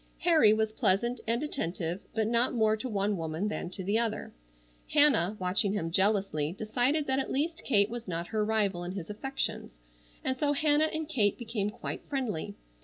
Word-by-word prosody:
Harry 315 -11 +6
was 220 0 +1
pleasant 230 +4 +1
and 235 +5 0
attentive, 175 - -3
but 220 -1 +1
not 235 +3 +2
more 220 -2 +3
to 250 +4 -5
one 200 -1 0
woman 165 +5 -2
than 180 - -4
to 190 +1 -6
the 205 +4 +1
other. 230 -2 -2 0.6
Hannah, 275 - +4
watching 190 +2 +1
him 165 -5 -2
jealously, 190 -5 +1
decided 245 +9 0
that 265 0 +1
at 270 - -3
least 325 +5 -1
Kate 205 -6 +4
was 235 0 -7
not 170 -1 -4
her 215 -1 0
rival 205 -5 0
in 175 +1 -5
his 190 -1 -6
affections, 215 - -4 0.5
and 260 0 -1
so 290 -1 +2
Hannah 300 +1 +3
and 315 -1 -3
Kate 215 -10 +1
became 225 -4 -2
quite 235 +3 -6
friendly. 225 - -3
215 Hz, 180 wpm, -30 LUFS, 195-260 Hz, 0.6 s, Harry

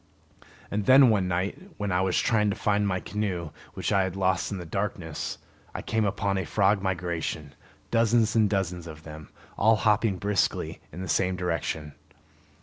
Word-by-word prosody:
And 100 -1 -2
then, 130 -2 +8
one 100 -4 +1
night 90 +2 -1 0.2
when 105 -2 -2
I 90 0 +2
was 95 -2 +1
trying 105 -2 +2
to 100 - -1
find 105 -1 +1
my 95 -2 0
canoe 90 -7 -3 0.2
which - - -2
I 100 - +4
had 95 -1 -2
lost 95 -1 0
in 100 - -3
the 90 - -7
darkness, 85 -3 -3 0.4
I - - -4
came 110 -1 0
upon 100 -1 0
a - - -1
frog 100 +3 +2
migration, 85 -5 -3 0.4
dozens 115 -1 +3
and 110 -2 +4
dozens 90 -4 -2
of 75 -1 -10
them, 75 -1 -10 0.3
all 110 +2 +5
hopping 105 -2 +2
briskly 100 +1 -1
in 90 +4 -6
the - - -5
same 90 +2 +1
direction. 85 -4 -3
95 Hz, 175 wpm, -27 LUFS, 90-105 Hz, 0.4 s, then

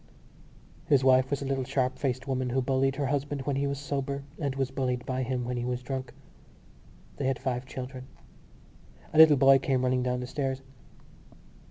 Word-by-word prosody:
His 140 -3 +4
wife 130 0 +5
was 140 0 -2
a - - -4
little 135 -1 -1
sharp 130 0 -1
faced 130 -1 -2
woman 130 -1 -1
who 130 +2 +1
bullied 135 +1 +1
her 140 0 -1
husband 140 0 -2
when 140 0 -1
he 140 +1 0
was 140 0 -2
sober 140 0 -3 0.2
and 140 -4 -2
was 135 -1 -1
bullied 125 -2 -2
by 130 0 -2
him 125 -1 -2
when 125 0 -3
he 120 - -2
was 125 0 -3
drunk. 130 0 -4 1.1
They 135 - -1
had 135 -1 +1
five 130 -1 -3
children. 130 0 -7 1.1
A 155 - +3
little 155 -2 +9
boy 135 0 +6
came 130 -1 0
running 125 0 +2
down 125 0 -1
the 125 - -4
stairs. 135 0 -3
130 Hz, 190 wpm, -28 LUFS, 130-140 Hz, 1.1 s, little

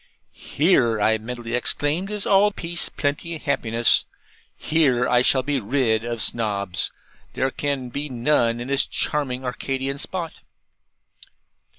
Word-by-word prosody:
'Here,' 135 - +1
I 110 +1 +2
mentally 120 +1 -6
exclaimed, 145 +9 0
'is 210 -1 -3
all 200 +1 +4
peace, 170 -3 -1
plenty, 160 +3 -2
happiness. 115 -6 +1 0.5
Here, 135 -6 +2
I 125 0 +4
shall 130 +1 +3
be 145 0 0
rid 115 -1 0
of 115 -2 -2
Snobs. 100 -5 -1 0.4
There 130 +1 0
can 140 -3 -3
be 145 +4 -4
none 120 -2 +1
in 120 - -5
this 140 0 +2
charming 130 -3 -1
Arcadian 135 +2 -3
spot.' 170 +1 -4
130 Hz, 125 wpm, -23 LUFS, 120-150 Hz, 0.5 s, all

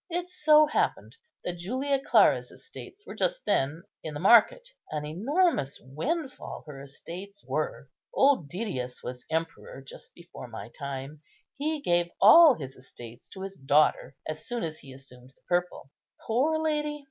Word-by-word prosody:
It 355 +1 -3
so 305 -3 +5
happened 300 - -1 0.3
that 175 -1 -4
Julia 260 +9 -1
Clara's - - +4
estates 420 -2 -12
were - - -8
just - - -2
then 145 +5 0 0.2
in 155 -2 -6
the - - -4
market. 240 - +5 0.2
An 150 -1 -4
enormous 225 - 0
windfall 260 - -5
her 140 -3 -9
estates 180 +8 -10
were. - - -3 0.2
Old 265 - +3
Didius 140 - -4
was 125 0 -8
emperor 160 -4 -4
just 135 - -13
before 170 -6 -11
my 115 -1 -9
time; 140 +2 -7 0.3
he 305 +1 -2
gave 175 -5 +1
all 290 +7 +9
his 135 -6 -8
estates 120 -2 -12
to 190 - -9
his 195 0 -7
daughter 140 0 +2
as 155 0 -6
soon 240 -1 -3
as 155 -1 -4
he 135 - -13
assumed 130 -1 -15
the - - -36
purple. 175 -6 -2 0.3
Poor 275 +8 +1
lady! 300 -1 -1
175 Hz, 155 wpm, -28 LUFS, -, 0.3 s, all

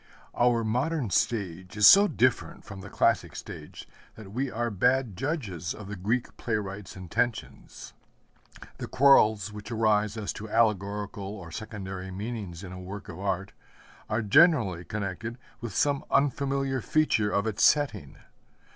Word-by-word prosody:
Our 120 -1 +2
modern 125 - -1
stage 95 -3 -1
is 105 - +5
so 200 - +9
different 130 - 0
from 95 -1 -9
the 100 - -9
classic - - +1
stage - - -9 0.3
that 105 -3 -11
we 130 +5 -2
are 120 0 -2
bad 125 +2 +1
judges 100 - -3
of 105 -2 -10
the 100 - -5
Greek 110 +7 -2
playwright's 105 -3 -4
intentions. 100 +5 -4 0.9
The - - -5
quarrels 110 -7 +4
which 105 +1 -9
arise 110 -2 +1
as 105 -2 -3
to 110 +1 -8
allegorical 105 -2 0
or 85 -5 -10
secondary 95 -2 -6
meanings 100 -3 -6
in 95 - -8
a 90 - -8
work 95 +2 -8
of - - -8
art 95 0 -2 0.6
are 110 +1 0
generally 105 - +4
connected 105 +4 -4 0.2
with 120 -5 -6
some 140 -1 +1
unfamiliar 135 -1 +1
feature 135 -9 +2
of 100 0 0
its 110 -2 -1
setting. 125 - +2
105 Hz, 145 wpm, -27 LUFS, 95-120 Hz, 0.9 s, so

